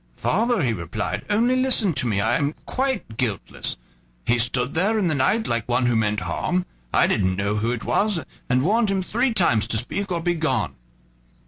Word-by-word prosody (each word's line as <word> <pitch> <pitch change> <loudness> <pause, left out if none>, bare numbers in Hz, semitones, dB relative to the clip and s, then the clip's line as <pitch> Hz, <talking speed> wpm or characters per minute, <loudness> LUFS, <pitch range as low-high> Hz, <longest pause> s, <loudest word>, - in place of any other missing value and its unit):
"Father," 230 - +1
he 120 -3 +1
replied, 85 -6 -3
"only 235 +5 +3
listen 255 -8 +2
to 130 -3 -1
me; 105 -4 0
I 110 - +2
am 150 -1 0
quite 260 - -2
guiltless. 110 -8 -2 0.5
He 120 0 +2
stood 125 +2 +1
there 200 +7 +2
in 190 -5 +1
the - - +1
night, 190 +11 +1
like 115 0 -2
one 125 +1 +2
who 120 -1 +2
meant 105 -2 +1
harm. 180 - -1 0.3
I - - +4
didn't 95 -3 +1
know 100 +2 -1
who 110 +2 0
it 120 -2 -2
was, 205 -4 +1 0.3
and 125 +1 +3
warned 215 +5 +2
him 195 -1 0
three 240 +7 0
times 120 - +2
to 115 - +1
speak 195 - -1
or 170 - 0
begone." 155 - 0
140 Hz, 195 wpm, -23 LUFS, -, 0.5 s, I